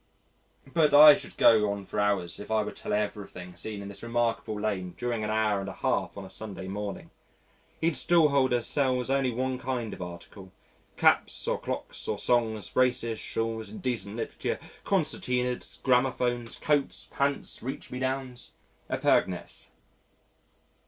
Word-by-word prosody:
But 155 -3 +4
I 150 +1 +11
should - - -6
go 105 -2 +5
on 100 -1 -5
for 105 - -4
hours 100 -4 0
if 105 - -9
I 110 -1 +2
were 105 - -5
to - - -12
tell - - -4
everything 100 -4 -3
seen 100 +4 -5
in - - -7
this 100 - -8
remarkable 115 -2 -1
lane 95 -4 -2
during 120 -3 -2
an 105 - -2
hour 110 -2 +1
and 100 0 -4
a - - -6
half - - -1
on - - -6
a - - -11
Sunday 95 -4 -7
morning. 100 +1 -5 0.7
Each 165 -1 +2
stall 170 -3 +4
holder 130 -4 +2
sells 130 -2 +1
only 135 -1 +2
one 130 +1 -2
kind 125 -4 -3
of - - -9
article 90 +2 -9 0.5
caps - - +3
or - - 0
clocks - - -5
or 105 - -1
songs, 110 -2 +1
braces, 115 -3 +1
shawls, 115 0 -3
indecent 120 - -3
literature, 115 - -3 0.2
concertinas, 125 0 -1
gramophones, 125 -2 +1
coats, 145 -2 0
pants, 140 0 -1
reach 130 +3 -6
me 125 - -4
downs, 130 -2 -3 0.4
epergnes. - - 0
115 Hz, 155 wpm, -28 LUFS, 105-130 Hz, 0.7 s, I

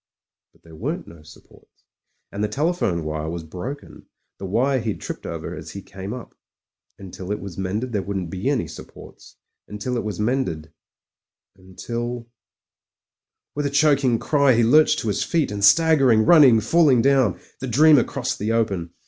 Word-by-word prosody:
But - - -31
there 80 -1 -15
weren't 80 - -4
no 85 -2 -14
supports, 75 - -20 0.5
and 100 +1 -4
the - - +1
telephone 135 - -1
wire 80 0 -4
was 85 0 -5
broken 105 - -9 0.2
— - - -55
^the 95 - -4
wire 130 +7 +1
he'd 110 -3 -4
tripped - - -7
over - - -6
as - - -9
he 100 - -8
came 95 +1 -8
up. 125 0 -8 0.6
Until 95 0 -8
it 105 - -2
was 95 -3 -8
mended 105 +7 -3
there 105 - 0
wouldn't 95 -4 -4
be 95 +8 -2
any 140 -5 -1
supports - - -13 0.2
— - - -61
until 105 +5 -4
it 115 - -2
was 105 0 -5
mended 105 - -2 0.4
— - - -66
^until 120 +6 -6 1.3
With 145 0 -2
a - - -2
chc4cing 140 -4 +2
cry 140 -4 +3
he 120 - +3
lurched 150 +7 +4
to - - -5
his 105 -1 0
feet: 160 -9 0
and 100 -1 -4
staggering, 130 -1 +5
running, 140 -10 +6
falling 135 -1 +3
down, 130 -8 +2 0.2
the 130 - -5
dreamer 145 +2 +5
crossed - - -4
the 105 +2 -1
open. 100 -7 -1
115 Hz, 175 wpm, -22 LUFS, 95-135 Hz, 1.3 s, running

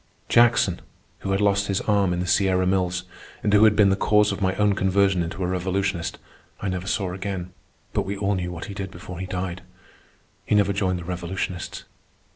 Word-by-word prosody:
Jackson, 115 -6 +4 0.4
who - - -5
had 95 - +1
lost 100 0 +2
his 100 -1 0
arm 100 -3 +2
in 90 - -1
the 90 - -1
Sierra 95 0 +2
Mills 90 -1 0 0.4
and 105 - +1
who 105 +1 +7
had 105 -1 +5
been 100 -2 +5
the 95 - +3
cause 105 +1 +3
of - - -5
my 95 -1 +1
own 105 0 +3
conversion 95 -1 +2
into 85 +3 -4
a - - 0
revolutionist, 95 -1 -1 0.4
I 100 - -2
never 95 0 -4
saw 95 -3 -1
again; 95 -2 -5 0.4
but - - +1
we 100 +1 -4
all 100 0 0
knew 90 -2 -2
what 85 -2 -6
he 100 - -7
did 95 0 -5
before 90 0 -9
he 95 - -4
died. 90 0 -4 0.8
He - - +1
never 100 -1 +3
joined 95 -2 0
the 90 - -7
revolutionists. 90 0 -4
95 Hz, 205 wpm, -24 LUFS, 90-100 Hz, 0.8 s, who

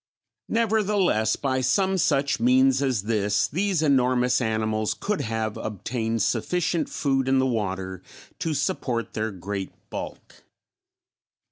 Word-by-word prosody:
Nevertheless 205 - +2
by 130 -2 -1
some 190 +10 +2
such 140 -3 +1
means 130 +3 +4
as 130 -7 0
this, 105 -1 +1
these 185 0 0
enormous 125 -3 +3
animals 110 -1 0
could 210 -1 -2
have 110 -1 -2
obtained 110 +1 -2
sufficient 165 - 0
food 135 -2 0
in 135 - +4
the 130 - +3
water 95 -6 -2 0.4
to 160 -2 -1
support 135 -7 -2
their 110 +1 -1
great 95 0 -5 0.2
bulk. - - -8
125 Hz, 120 wpm, -25 LUFS, 110-145 Hz, 0.4 s, means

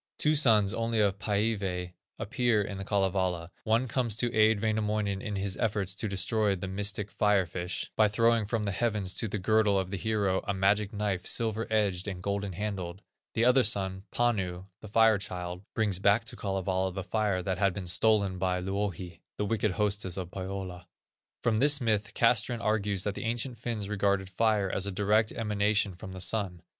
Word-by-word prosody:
Two 155 0 +2
sons 110 -9 +4
only 115 -1 -1
of 100 -2 +2
Pæivæ 100 -4 -1 0.2
appear 120 -4 +1
in 100 -1 -6
The - - -4
Kalevala, 95 -4 0
one 115 +4 +2
comes 120 -3 +1
to 120 +1 -1
aid 110 0 +4
Wainamoinen 105 -2 0
in 105 -4 -4
his 95 -1 -2
efforts 105 -4 -1
to 110 +2 -3
destroy 100 +1 +1
the 95 +1 -5
mystic 100 +1 -2
Fire 105 -3 +2
fish, 90 +2 -4
by 110 - +5
throwing 115 0 +2
from 110 0 -1
the 100 - -1
heavens 105 -3 -1
to 115 - -2
the 105 - -3
girdle 105 +1 +3
of 95 -1 -2
the 100 - -2
hero, 100 -1 0
a 100 - 0
"magic 100 +2 +2
knife, 100 -4 -2
silver 115 -1 -1
edged, 100 -4 0
and 90 -2 -5
golden 100 -1 -2
handled;" 95 -1 -4 0.3
the 115 - +3
other 125 +1 +5
son, 95 -3 -1
Panu, 95 -7 0
the - - -10
Fire 110 0 +4
child, 90 -2 -6
brings 105 -5 +1
back 100 +4 +3
to 115 - -5
Kalevala 95 -1 -1
the 95 +1 -5
fire 100 -2 0
that 95 0 -2
bad 100 -1 +3
been 95 - -5
stolen 100 0 +2
by 90 -1 0
Louhi, 95 -2 -4 0.2
the 105 - -1
wicked 105 -2 0
hostess 100 -2 -1
of 90 -2 -5
Pohyola. 95 -1 -6 0.6
From 115 -3 +2
this 145 +2 +5
myth 110 -4 -1
Castrén 120 +1 +2
argues 105 -3 0
that 105 - -1
the 115 - -6
ancient 120 +1 -2
Finns 115 -4 -3
regarded 100 -2 0
fire 105 0 +2
as 95 +1 -1
a - - -2
direct 105 +3 +2
emanation 105 -2 +1
from 95 +2 -9
the 95 - -7
Sun. 95 -3 -1
100 Hz, 190 wpm, -29 LUFS, 95-110 Hz, 0.6 s, by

